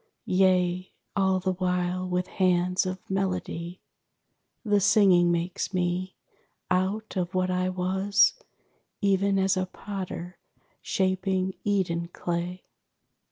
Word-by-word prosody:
Yea, 185 -1 +2 0.2
all 190 -2 +2
the 185 0 -1
while 180 0 -1
with 180 0 0
hands 180 0 +1
of 185 0 -6
melody, 185 -2 -3 0.9
The 205 -1 +3
singing 190 -3 +5
makes 175 +2 -2
me, 180 +1 -1 0.6
out 195 +5 0
of 185 0 -2
what 185 0 +1
I 185 0 0
was, 190 +3 +2 0.7
Even 200 0 +2
as 190 +1 +2
a 185 0 -1
potter 185 -2 -6 0.4
shaping 190 0 0
Eden 175 -5 0
clay. 175 +1 -4
185 Hz, 110 wpm, -27 LUFS, 180-190 Hz, 0.9 s, singing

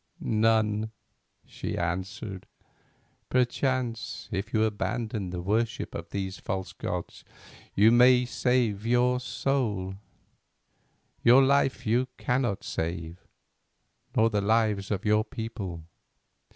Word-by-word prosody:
"None," 110 -1 +2 0.6
she - - -5
answered. 95 +3 -4 0.8
"Perchance 125 -2 -1
if 100 -1 -3
you 110 -1 +2
abandon 110 -1 -2
the 90 -1 -5
worship 110 +4 -1
of - - -6
the 95 -1 -2
false 95 0 -4
gods - - -5 0.5
you 105 +3 +6
may 125 +1 +6
save 120 -5 +1
your 125 +2 +3
soul; 115 -8 -1 1.3
your 125 +3 +7
life 135 -2 +2
you 120 +4 +2
cannot 125 -6 0
save, 85 +1 -4 0.9
nor 115 +1 +4
the 105 -1 +1
lives 105 -2 +1
of 100 -1 -2
your 105 0 +3
people." 100 -8 -6
110 Hz, 105 wpm, -28 LUFS, 100-125 Hz, 1.3 s, your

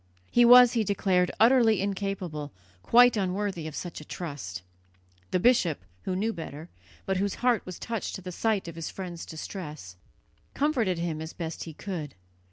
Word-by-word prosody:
He 240 0 +5
was, 245 0 +9
he 230 -3 +2
declared, 185 -3 +1
utterly 230 -2 +5
incapable, 190 -7 -3 0.3
quite 240 - +6
unworthy 190 -4 -2
of 155 - -7
such 175 -3 -6
a - - -9
trust. 140 - -6 0.7
The 185 - +1
bishop, 180 - +3 0.2
who 185 - -1
knew 220 +4 0
better, 160 -1 -8 0.4
but 190 -1 0
whose 200 +1 -1
heart 240 -4 +3
was 185 - -6
touched 230 -3 -4
at 190 - -12
the 180 - -6
sight 210 0 0
of 170 - -6
his 165 -1 -5
friend's 175 -3 -7
distress, 155 - -8 0.6
comforted 245 - +1
him 165 -2 -3
as 160 +1 -6
best 165 -1 -5
he 165 - -8
could. 165 -8 -6
185 Hz, 170 wpm, -28 LUFS, 160-215 Hz, 0.7 s, was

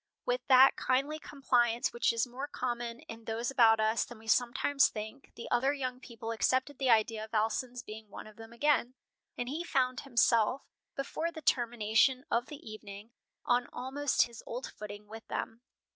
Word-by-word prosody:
With 245 0 0
that 265 0 +7
kindly 275 +4 0
compliance 245 -6 +1
which 235 - +2
is 230 +1 0
more 255 +3 -6
common 240 -3 -4
in 225 0 -11
those 230 +3 -2
about 225 -4 +5
us 220 +1 +2
than 240 - -10
we 220 - -16
sometimes 245 +5 +3
think, 220 +6 -8
the 235 - -8
other 270 +4 +3
young 255 -3 -4
people 230 -3 -7
accepted 260 +4 0
the 265 -2 +1
idea 220 -1 +3
of 220 +1 -7
Alson's 240 +3 -1
being 215 0 -10
one - - -9
of 215 -1 -13
them 225 +1 -12
again, 255 0 +1 0.4
and 245 - -3
he 305 +6 -3
found 255 -6 0
himself, 240 -1 +2 0.3
before 315 +4 -3
the 315 -2 -9
termination 240 +1 +2
of 240 +2 +1
the 295 -5 -10
evening, 215 0 -9 0.3
on 245 0 +2
almost 270 +3 +1
his 235 -2 -9
old 245 +3 -4
footing 210 0 -9
with 220 +2 -11
them. 225 +1 -4
240 Hz, 175 wpm, -31 LUFS, 225-265 Hz, 0.4 s, that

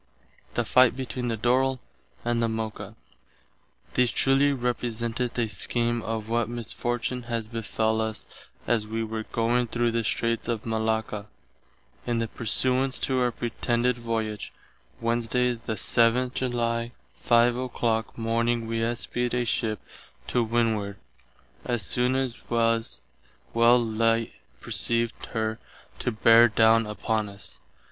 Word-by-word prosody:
_ - - -27
THE 120 - +1
FIGHT 125 +1 +5
BETWEEN 125 -1 -4
THE 115 -1 -1
DORRILL 130 +3 +2 0.5
AND 120 -1 +1
THE 115 - +1
MOCA 110 -1 -4 1.0
These 125 -1 +3
truly 135 +3 +3
representeth 120 -1 -2
a 120 -2 +1
scheem 120 +3 0
of 110 -1 -4
what 115 0 0
misfortune 120 +1 -3
has 115 -2 -2
befell 110 -1 -1
us 110 -1 -3 0.4
as 110 -3 +1
we 115 +1 -2
were 110 0 -4
going 120 +1 +1
through 120 +1 0
the 115 0 0
streights 115 +1 0
of 115 -3 -2
Malacca, 110 -2 -1 0.8
in 120 -1 +1
the 115 0 0
persuance 130 +4 +1
to 130 -1 +1
our 125 -1 +2
pretended 120 +1 0
voyage, 115 -3 -3 0.4
vizt., - - -28
Wednesday 120 +2 +1
the 115 -1 -5
7th 120 +3 +2
July, 120 -2 -1 0.2
5 120 0 +4
o'clock 120 -3 -1
morning 115 +1 0
we 115 0 -2
espied 120 +1 -1
a 120 0 +1
ship 110 -1 -1 0.5
to 120 - +1
windward; 110 -3 0 0.7
as 120 -4 -1
soon 125 +7 +1
as 130 -3 -3
was 115 -1 +1 0.5
well 115 +1 +6
light 115 0 +1 0.3
perceived 115 0 0
her 110 0 -2 0.4
to 125 - -1
bare 115 +1 +6
down 110 0 +4
upon 105 0 -1
us. 100 0 -8
115 Hz, 135 wpm, -26 LUFS, 110-120 Hz, 1.0 s, well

